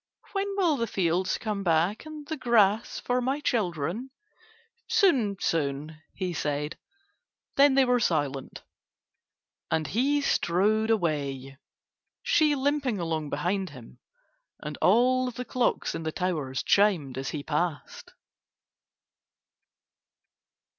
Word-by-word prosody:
"When 395 0 -2
will 340 -7 +2
the 230 - -1
fields 180 -1 0
come 210 -3 -3
back 175 - +1
and 305 -1 -8
the 315 - -3
grass 225 -5 +2
for 250 0 0
my 265 +4 -1
children?" 210 - -1 0.8
"Soon, 250 - +3
soon," 155 0 -2
he 185 -2 -3
said: 150 -1 -2 0.8
then 280 -1 +5
they 270 -1 +5
were 250 0 +3
silent. 145 - -1 1.1
And 160 -1 0
he 270 - +1
strode 215 -1 +1
away, 140 - -1 0.6
she 310 -3 +3
limping 275 -5 0
along 160 -3 -2
behind 180 +6 -1
him, 125 -3 -13 0.6
and - - -6
all 255 +1 +4
the 250 +1 -6
clocks 250 -1 0
in - - -4
the 160 -1 -3
towers 155 -8 -2
chimed 180 -11 +2
as 135 +1 -4
he 145 -2 -5
passed. 155 -1 -3
195 Hz, 115 wpm, -27 LUFS, 155-250 Hz, 1.1 s, then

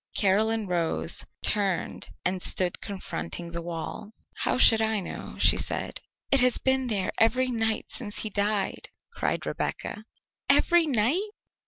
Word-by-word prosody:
Caroline 215 +2 +2
rose, 165 - 0 0.2
turned, 200 -4 0 0.2
and 185 0 -1
stood 180 -1 +3
confronting 170 - -6
the 170 0 -4
wall. 170 +5 -6 0.3
"How - - +1
should 225 -3 +6
I 220 -1 +1
know?" 185 - -7
she - - +6
said. - - -2 0.3
"It 275 - +6
has 250 0 +5
been 265 -1 +1
there 200 -5 -1
every 255 +3 +3
night 225 -2 -1
since 210 -5 -1
he 215 - -3
died," 205 0 -1 0.2
cried - - -2
Rebecca. 215 +1 -4 0.4
"Every 345 -2 +4
night?" 285 - +1
210 Hz, 140 wpm, -27 LUFS, 185-235 Hz, 0.4 s, should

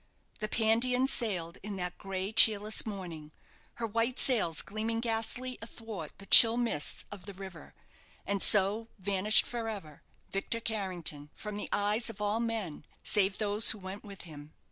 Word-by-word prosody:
The 215 - -3
"Pandion" 235 +4 +1
sailed 185 -10 -1
in 205 0 -7
that 180 -1 -6
gray 195 0 -5
cheerless 215 0 +4
morning, 170 -7 -8 0.4
her 235 - -4
white 230 +3 -2
sails 210 - +2
gleaming 220 +2 -4
ghastly 235 +2 -2
athwart 225 -8 -9
the 200 - -11
chill 230 +3 +9
mists 230 -12 -1
of 205 -3 -10
the 200 -2 -10
river, 190 -4 -11 0.5
and 200 -1 -2
so 210 +3 +6
vanished 200 +2 +3
for 230 -2 -5
ever 160 -9 -9 0.3
Victor 195 +4 -2
Carrington 180 -10 -4
from 210 -1 -7
the 205 - -5
eyes 210 +3 0
of 215 -2 -10
all 210 +2 -1
men, 225 -10 -4 0.2
save 195 -2 +1
those 210 +1 +1
who - - +1
went 190 +1 -9
with 200 -2 -10
him. 150 -2 -11
205 Hz, 160 wpm, -30 LUFS, 190-225 Hz, 0.5 s, chill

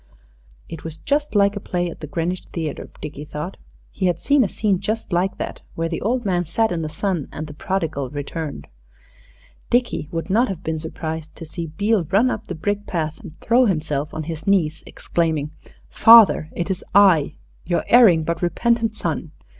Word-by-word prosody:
It 165 - -8
was 160 -1 -7
just 290 - -1
like 200 0 +4
a - - -3
play 175 -2 -2
at 170 - -8
the 155 - -7
Greenwich 170 +4 -2
Theatre, 160 -3 -4
Dickie 150 -1 -6
thought. 150 +5 -6 0.3
He 190 - -1
had 175 -2 0
seen 280 -2 +3
a 200 - -1
scene 200 -4 0
just 215 0 -3
like 180 +3 +1
that, - - -5
where 165 0 -1
the 165 - -3
old 240 +3 0
man 180 -3 +1
sat 220 +6 0
in 170 -2 -1
the 155 - -3
sun 170 -1 -2
and 155 - -5
the 150 - -9
Prodigal 160 -5 -2
returned. 150 +1 -5 1.0
Dickie 240 -10 0
would 165 +3 -3
not 235 +6 +4
have 190 -4 -5
been 160 0 -2
surprised 160 0 -6
to 165 - -9
see 165 +2 -6
Beale 200 +4 +1
run 205 +10 +3
up 215 - -5
the - - -4
brick 205 +5 -2
path 160 -3 -2
and 180 -9 -11
throw 245 +2 +4
himself 150 -6 -1
on 155 - -4
his 160 +1 -6
knees, 170 -5 +2
exclaiming, 160 -3 -1 0.4
"Father, 225 -8 +7
it 175 +3 -2
is 185 - -3
I 175 -7 +5 0.3
your 175 0 -1
erring 210 -10 +6
but 165 +1 -2
repentant 225 +5 +1
son! 165 -3 -3
175 Hz, 190 wpm, -22 LUFS, 160-205 Hz, 1.0 s, Father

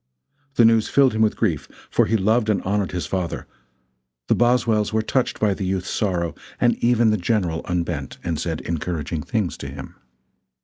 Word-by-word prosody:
The 115 - +6
news 115 -1 +4
filled 135 -3 +4
him 110 - 0
with 110 -1 +3
grief, 85 -10 -1 0.2
for - - +3
he 110 - +2
loved 110 +3 +2
and 105 - +2
honored 100 0 0
his 90 -4 -3
father; 90 +1 -3 0.8
the - - +5
Boswells 120 -3 +2
were 110 0 +1
touched 130 +2 0
by 105 -2 +2
the 95 - -5
youth's 95 0 -2
sorrow, 85 -5 -1 0.3
and 120 - +3
even 120 -2 +4
the 105 - +2
General 90 -4 0
unbent 85 -6 -3
and 80 -3 -2
said 80 -2 -3
encouraging 85 -1 -3
things 105 - -2
to 70 - -7
him. 70 0 -8
100 Hz, 180 wpm, -22 LUFS, 85-110 Hz, 0.8 s, The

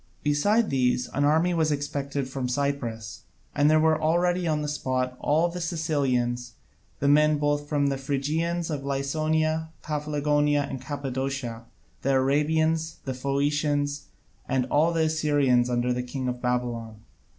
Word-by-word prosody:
Beside 205 +10 +2
these, 125 -2 +1
an 145 - -1
army 160 +4 +3
was 160 -2 +1
expected 140 -1 -2
from 130 -1 -3
Cyprus, 125 -5 -3 0.3
and 145 0 +3
there 155 0 +5
were 155 0 +3
already 175 +2 +1
on 155 -1 0
the - - -2
spot 130 -3 -2
all 160 +4 +2
the 175 +1 -5
Cilicians, 130 -8 -1 0.5
the 140 - 0
men 150 +1 +5
of 150 - -1
both 145 0 0
the 140 -2 +1
Phrygias, 160 +5 -1
of 145 -2 -2
Lycaonia, 155 +3 0
Paphlagonia, 150 -1 +1
and 135 -2 -6
Cappadocia, 135 -4 -4 0.4
the 135 - +1
Arabians, 155 +4 +1
the 130 - -2
Phoenicians, 145 +1 0 0.4
and 130 -1 +1
all 155 +3 +3
the 165 -1 +1
Assyrians 145 -6 +2
under 125 0 +1
the 125 - -2
king 130 +1 -4
of 125 0 -3
Babylon. 120 -3 -2
145 Hz, 145 wpm, -26 LUFS, 130-155 Hz, 0.5 s, there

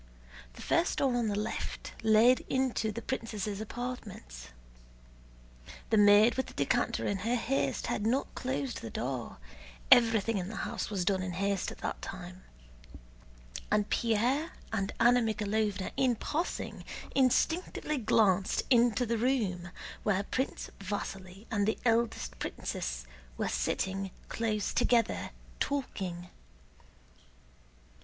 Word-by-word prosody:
The - - -10
first 335 +1 +2
door 265 -3 +2
on 240 -2 +1
the 205 -1 -1
left 210 +1 -4
led 220 +3 +6
into 260 -4 +1
the 230 +2 -6
princesses' 215 -5 -3
apartments. 210 - -6 1.4
The 220 - +5
maid 205 +2 +7
with 260 - 0
the - - -12
decanter - - +1
in 200 - 0
her 230 +6 0
haste 255 +3 0
had 205 - -1
not 260 +4 0
closed 260 0 -3
the 115 - -6
door 125 0 -4 0.5
(everything 225 -3 +5
in 180 +1 -4
the 220 - -6
house - - -3
was 195 -4 -1
done 190 0 +2
in 185 -1 -3
haste 200 +1 0
at - - -10
that - - -3
time), 185 -1 -8 1.3
and 210 -1 +1
Pierre 240 +8 +1 0.2
and 195 -2 0
Anna 240 +1 +6
Mikháylovna 210 -2 -1
in 255 -3 +3
passing 320 +9 -3 0.3
instinctively 300 +3 +1
glanced 200 -4 +3
into 240 -1 +4
the 230 -1 -1
room, 210 -9 0 0.3
where 200 -2 +1
Prince 260 +6 -3
Vasíli 195 0 -5
and 205 -2 +1
the 220 - +1
eldest 230 0 +1
princess - - -4 0.3
were - - 0
sitting 190 - -1 0.2
close 215 -3 -1
together 235 -2 +2 0.3
talking. 185 -11 -3
215 Hz, 125 wpm, -31 LUFS, 195-245 Hz, 1.4 s, maid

